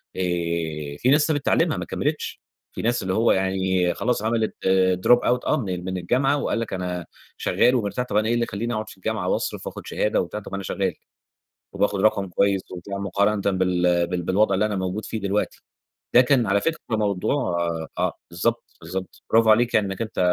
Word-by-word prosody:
آآ 85 -5 -2
في 125 - +2
ناس 150 +2 +5
سابت 145 -3 -1
تعليمها - - +2
ما - - -4
كملتش، - - -3 0.3
في - - -6
ناس 120 0 0
اللي 95 0 -1
هو 115 +3 +3
يعني 95 -1 +1
خلاص 125 -4 -1
عملت 110 0 0 0.5
drop 120 - +7
out 125 0 +1
آه 155 - +3
من 95 - -3
من 95 0 -3
الجامعة، 130 +11 +1
وقال 130 -4 -1
لك 115 - -4
أنا 90 -2 -3 0.3
شغّال 125 +1 +3
ومرتاح، 115 +1 -1
طب 125 - -5
أنا 110 +1 +2
إيه 115 - +2
اللى 120 0 +1
يخلّيني 115 +2 -3
أقعد 110 -1 -3
في - - -13
الجامعة - - -2
وأصرف - - -2
وآخد - - -8
شهادة 105 - +1
وبتاع؟ 90 +4 -5
طب 105 - -11
ما - - -3
أنا 95 - -4
شغّال، - - -1 0.8
وباخد 100 -1 0
رقم 100 -2 +2
كويس 95 +2 +2
وبتاع 95 +2 -6
مقارنةً 100 +2 +1 0.2
بال 90 -1 +2
بال 90 0 -2
بالوضع 100 +3 +2
اللي 105 +3 +2
أنا 105 - -2
موجود 95 +3 -3
فيه 110 - -4
دلوقتي، 100 +1 -2 0.5
ده 125 - +9
كان 125 -2 +3
على 100 +1 +2
فكرة 165 +6 -1 0.2
موضوع 100 -1 0 0.6
آه، - - +1 0.2
بالضبط، 115 +8 -1 0.2
بالضبط، 95 +3 -6
برافو 115 -1 +5
عليك 120 +2 +4
يعنى 105 -2 +4
إنك 95 +3 -4
أنت 110 - -6
100 Hz, 200 wpm, -24 LUFS, 90-115 Hz, 0.8 s, ده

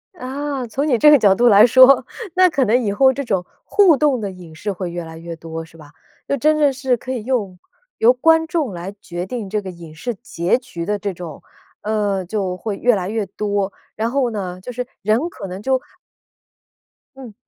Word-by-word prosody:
啊， 275 -2 -4
从 270 +7 -2
你 255 -5 +3
这 300 +6 +7
个 295 - +7
角 200 -4 +5
度 245 +4 +3
来 210 -1 +8
说， 260 +1 +6 0.3
那 370 0 +6
可 280 -5 +1
能 245 +3 +2
以 205 - 0
后 265 +5 +4
这 280 - -4
种 195 -8 -1 0.2
互 380 -8 +4
动 285 -4 +2
的 200 -2 -3
影 175 -4 -13
视 205 +6 -3
会 185 -2 -5
越 175 0 -5
来 160 0 -10
越 165 0 -7
多， 165 0 -7
是 165 0 -19
吧？ 150 -2 -15 0.4
就 - - +1
真的 300 0 +3
是 255 -1 0
可 255 - -7
以 245 -4 -3
用 215 -7 -2 0.4
由 235 +2 +5
观 320 +5 +3
众 310 - -1
来 180 +3 -6
决 175 0 -5
定 215 -1 -5
这 210 +1 -1
个 190 - -7
影 170 -3 -11
视 235 +9 -5
结 175 +1 -1
局 250 -10 -7
的 210 +3 -1
这 200 -1 -4
种， 170 -4 -9 0.4
呃， 205 -3 -1
就 190 -1 -3
会 205 +1 -4
越 245 +1 +3
来 185 -1 -3
越 220 -1 -2
多， 200 0 -2 0.2
然 225 +2 -1
后 265 -2 +1
呢， 185 -4 -5
就 250 - -7
是 250 0 -5
人 225 - +1
可 195 - -8
能 185 +1 -7
就 260 +3 +1 1.4
嗯。 260 -5 -11
215 Hz, 230 characters per minute, -19 LUFS, 185-260 Hz, 1.4 s, 来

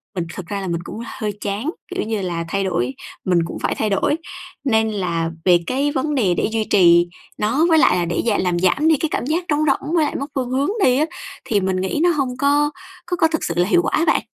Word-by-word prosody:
mình 175 -2 -2
thực 180 - -7
ra 200 +1 -3
là 190 - -4
mình 170 -1 -2
cũng 215 - -8
hơi 215 -5 -4
chán, 205 +8 -2 0.3
kiểu - - -1
như 215 -1 -2
là 170 -2 -3
thay 195 +2 0
đổi, 135 -9 -1 0.3
mình 180 -2 +3
cũng - - -6
phải - - -1
thay 215 - -1
đổi, 200 +8 +1 0.5
nên 220 -5 +2
là 170 -5 -2
về 175 -2 +6
cái 275 +3 0
vấn 290 +2 -1
đề 205 -9 +2
để - - 0
duy 220 -1 0
trì 175 -3 +5 0.3
nó 240 +10 +2
với 325 - +5
lại 180 - +4
là 175 - 0
để 170 - -1
gi 220 -3 +2
làm 175 -1 0
giảm 190 - +2
đi 320 - +5
cái 320 - -1
cảm - - -1
giác 330 +5 -1
trống 300 0 +1
rỗng 295 +3 0
với 320 -3 +3
lại - - -3
mất 280 - -3
phương 255 -2 -1
hướng 270 +5 0
đi 255 0 +4
á, 305 - +3 0.4
thì 210 - +1
mình 190 0 0
nghĩ 190 +9 -1
nó 350 - +5
hông 265 -5 -1
có 290 +2 +2 0.3
có 360 0 -2
có 325 - +4
thực 320 -1 -2
sự - - -1
là 175 +1 +3
hiệu 350 - +4
quả - - -1
á 320 - +2
bạn. - - +3
220 Hz, 265 wpm, -20 LUFS, 185-290 Hz, 0.5 s, về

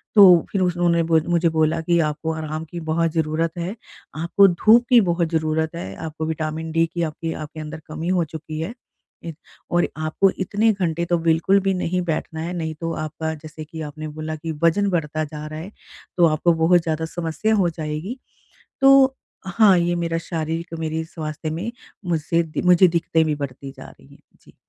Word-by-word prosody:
तो 185 -5 +8
फिर 195 - 0
उस 180 -1 +1
उन्होंने 170 -1 +2
बुज 160 -1 +2
मुझे 170 -1 +3
बोला 160 +1 +1
कि 170 +1 +2
"आपको 160 +2 -4
आराम 155 0 -5
की 175 - -5
बहुत 165 0 +1
ज़रूरत 160 0 0
है। 175 +5 -3 0.4
आपको 170 +5 +4
धूप 220 +7 +4
की 245 -2 +7
बहुत 170 -3 +1
जरूरत 160 0 -1
है। 95 - -6
आपको 160 0 -5
विटामिन 160 0 -3
डी 165 +1 +3
की 170 - -1
आपकी 160 +1 -3
आपके 155 +1 -8
अंदर 155 +1 -7
कमी 160 +1 -5
हो - - +2
चुकी 155 -1 -6
है। 165 +8 -4 0.5
इत 165 -2 -6 0.4
और 175 0 +2
आपको 155 +5 +2
इतने 205 +4 +2
घंटे 170 -4 -1
तो 175 0 +1
बिल्कुल 165 +4 +3
भी 195 0 +1
नहीं 180 0 -1
बैठना 160 -1 -3
है, 170 +2 -4
नहीं 160 -3 -3
तो 165 0 -2
आपका 155 +1 -4
जैसे 155 +1 -10
कि 160 +1 -8
आपने 155 +1 -6
बोला 155 +1 -5
कि 160 +1 -5
वजन 200 +5 +3
बढ़ता 155 -3 -1
जा 150 0 -7
रहा 155 0 -7
है 180 +6 -8 0.5
तो 175 - +6
आपको 160 +2 +2
बहुत 175 +1 +5
ज़्यादा 160 0 -2
समस्या 175 +6 -1
हो 190 -4 +2
जाएगी।" 160 +8 -5 0.6
तो 270 -1 +6 0.3
हाँ, 190 0 +5
ये 175 0 +1
मेरा 165 -1 -1
शारीरिक 165 0 -3
मेरी 160 0 -2
स्वास्थ्य 155 -1 -6
में 170 +9 -3 0.4
मुझसे 165 0 +1 0.2
मुझे 180 +1 +6
दिक्कतें 165 -1 +1
भी 155 -1 0
बढ़ती 140 -1 -6
जा - - -10
रही 70 - -19
हैं। - - -21 0.2
जी। - - -20
165 Hz, 190 wpm, -22 LUFS, 155-175 Hz, 0.6 s, तो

